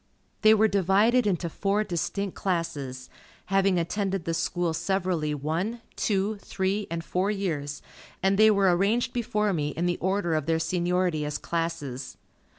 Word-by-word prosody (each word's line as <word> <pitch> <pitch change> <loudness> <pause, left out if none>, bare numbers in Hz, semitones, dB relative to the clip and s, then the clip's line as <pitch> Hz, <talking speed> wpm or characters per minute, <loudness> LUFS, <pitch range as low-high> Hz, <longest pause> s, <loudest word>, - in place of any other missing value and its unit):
They 215 0 +7
were 220 +1 +4
divided 205 +5 +3
into 180 -3 0
four 200 +5 0
distinct 195 +1 -2
classes, 150 -8 -3 0.5
having 195 -1 +3
attended 190 +1 -1
the 165 - -1
School 170 0 -1
severally 170 -3 -1
one, 170 - -2
two, 205 +1 0
three, 200 +1 -2
and 165 0 -3
four 185 +4 0
years, 155 -9 -3 0.4
and 195 +1 +3
they 215 +2 +6
were 195 -4 +4
arranged 230 +7 +1
before 210 -4 0
me 150 -3 -1
in 170 - 0
the 175 0 0
order 190 -2 0
of 155 -1 -1
their 165 -1 +2
seniority 175 0 0
as 150 0 -2
classes. 150 -7 -4
180 Hz, 155 wpm, -27 LUFS, 165-200 Hz, 0.5 s, They